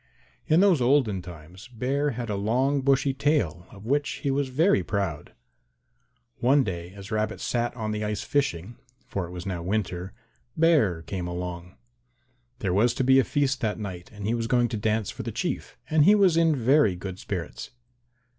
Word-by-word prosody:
In 160 +4 +4
those 190 -8 +4
olden 120 -7 +2
times 90 +2 -12
Bear 130 +5 -1
had 120 -3 -3
a - - -1
long 130 +8 +1
bushy 135 0 +2
tail 135 - 0
of 100 +1 -13
which 145 +4 +1 0.2
he 140 - +2
was 140 0 0
very 150 - +3
proud. 95 -6 -3 1.1
One 135 +3 +4
day 85 -4 -5
as 100 +2 -10
Rabbit 110 0 -1
sat 120 0 -1
on 110 -3 -3
the 105 0 -2
ice 105 0 -2
fishing 120 - -1 0.3
for 95 -3 -4
it - - -11
was 90 0 -7
now 90 -3 -3
winter 90 -1 -2 0.5
Bear 140 - +3
came 90 -2 -4
along. 90 0 -6 0.8
There 95 -8 -1
was 115 +5 +3
to - - 0
be 130 +1 +5
a - - +4
feast 140 -1 0
that 105 -2 -1
night 95 -4 -7
and 105 -2 -8
he 110 - +1
was 115 -1 -1
going 120 0 +2
to 120 - -3
dance 110 -1 0
for - - -7
the - - -4
Chief, - - -4
and 155 -1 +4
he 205 +7 +7
was 195 -5 +4
in 165 -2 +3
very 130 -5 +3
good 95 +1 -7
spirits. 90 -5 -5
110 Hz, 185 wpm, -26 LUFS, 95-135 Hz, 1.1 s, he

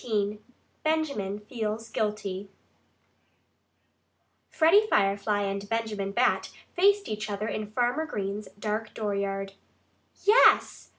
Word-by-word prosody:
XIX 210 -3 -1 0.4
BENJAMIN 280 -11 -1
FEELS 220 0 -4
GUILTY 205 -3 -3 2.0
Freddie 380 +7 +4
Firefly 205 - +1
and 200 0 -3
Benjamin 220 -3 -2
Bat 240 +5 +1 0.2
faced 400 +2 +3
each 215 +1 -4
other 205 +1 -3
in 215 -1 -4
Farmer 250 +7 0
Green's 205 -4 -4
dark 215 +1 -3
dooryard. 200 -2 -2 0.7
"Yes!" 430 +5 +5
210 Hz, 100 wpm, -27 LUFS, 200-245 Hz, 2.0 s, Yes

